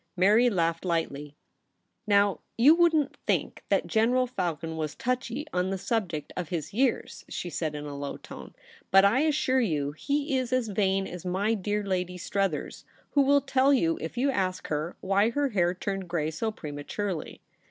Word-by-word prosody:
Mary 215 +7 +5
laughed 165 -5 0
lightly. 150 -5 -2 0.4
* - - -51 0.3
Now, 200 -1 +3 0.2
you 265 +7 +7
wouldn't 325 -4 +3
think - - -1
that - - +2
General 245 +3 +2
Falcon 170 - -3
was 155 -2 -3
touchy 255 +3 -2
on 180 +1 0
the 195 - -1
subject 185 -7 -2
of 175 -4 -4
his 160 -4 -3
72 - - -15
THE 245 - +1
REBEL 265 -3 +4
ROSE. - - -11
years - - -13
?' - - -26
she 175 - -4
said, 155 -1 -2
in 150 0 -5
alow 140 -1 -5
tone; - - -11 0.2
* - - -25
but 195 +1 +6
I 215 +6 +4
assure 285 -4 +2
you 150 - 0
he 280 - -1
is 255 -1 -4
as 255 -3 +1
vain 195 -1 +1
as 180 -2 -7
my 190 +4 0
dear 210 0 -1
Lady 180 -2 -2
Struthers, 195 -3 -2 0.3
who 285 - +4
will 280 +1 +4
tell 275 0 +3
you, 165 -12 +2
if 160 +8 -6
you 275 +3 +2
ask 185 -5 -2
her, 155 +3 -2
why 200 +3 +2
her 285 +3 0
hair 180 -5 +1
turned 195 0 -4
gray 160 -3 -1
so 220 +8 -2
prematurely.' 165 +1 -5
195 Hz, 195 wpm, -28 LUFS, 165-245 Hz, 0.4 s, you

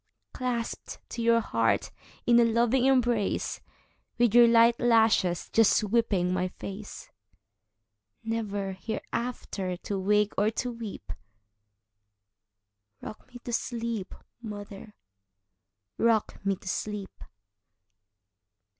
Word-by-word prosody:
Clasped 245 -2 -4
to 235 - -5
your 230 0 +4
heart 115 - 0 0.3
in 240 0 +5
a - - +6
loving 235 +2 +2
embrace, 240 -6 +1 0.6
With 240 -3 +3
your 240 0 +8
light 230 0 +5
lashes 220 -7 +3
just 225 -2 +5
sweeping 205 -5 +1
my 185 0 0
face, 195 +3 -9 1.1
Never 205 -3 -3
hereafter 195 -2 -4
to 195 +2 -4
wake 210 +2 +2
or 210 +1 +3
to 245 +2 -3
weep;—Rock 230 -4 -8 2.3
me 245 - -9
to 240 - -5
sleep, 230 -5 -3 0.3
mother,—rock 100 - -5
me 195 0 +1
to 190 - -15
sleep! 205 +1 -4
215 Hz, 95 wpm, -28 LUFS, 190-235 Hz, 2.3 s, your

